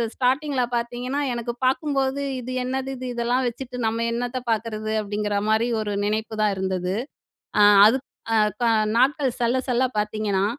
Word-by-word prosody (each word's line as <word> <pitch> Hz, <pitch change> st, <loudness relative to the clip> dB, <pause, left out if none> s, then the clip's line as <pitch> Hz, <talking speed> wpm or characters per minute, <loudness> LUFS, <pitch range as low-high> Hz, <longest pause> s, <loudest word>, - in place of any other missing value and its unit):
ஸ்டார்ட்டிங்கில 265 Hz, +1 st, +1 dB
பார்த்தீங்கன்னா 245 Hz, +4 st, -2 dB
எனக்கு 235 Hz, 0 st, -3 dB
பார்க்கும்போது, 270 Hz, 0 st, +1 dB, 0.2 s
"இது 250 Hz, +1 st, -6 dB
என்னது 265 Hz, +1 st, -2 dB
இது 255 Hz, 0 st, -6 dB
இதெல்லாம் 245 Hz, +2 st, +1 dB
வச்சுட்டு 250 Hz, +1 st, -6 dB
நம்ம 230 Hz, +1 st, -1 dB
என்னத்த 245 Hz, +2 st, -2 dB
பார்க்குறது?" 215 Hz, -1 st, -2 dB
அப்படிங்கிற 210 Hz, 0 st, -2 dB
மாரி 220 Hz, +2 st, +3 dB
ஒரு 205 Hz, -1 st, -3 dB
நினைப்புதான் 215 Hz, -1 st, 0 dB
இருந்தது. 185 Hz, -1 st, -1 dB, 0.7 s
அ -, -, +7 dB, 0.2 s
அதுக் 260 Hz, +5 st, +2 dB, 0.3 s
அ -, -, +4 dB, 0.3 s
க -, -, +3 dB, 0.3 s
நாட்கள் 270 Hz, -1 st, +2 dB
செல்ல 240 Hz, +2 st, +2 dB
செல்ல 250 Hz, +1 st, +2 dB
பார்த்தீங்கன்னா, 210 Hz, -2 st, 0 dB
240 Hz, 140 wpm, -24 LUFS, 215-260 Hz, 0.7 s, அ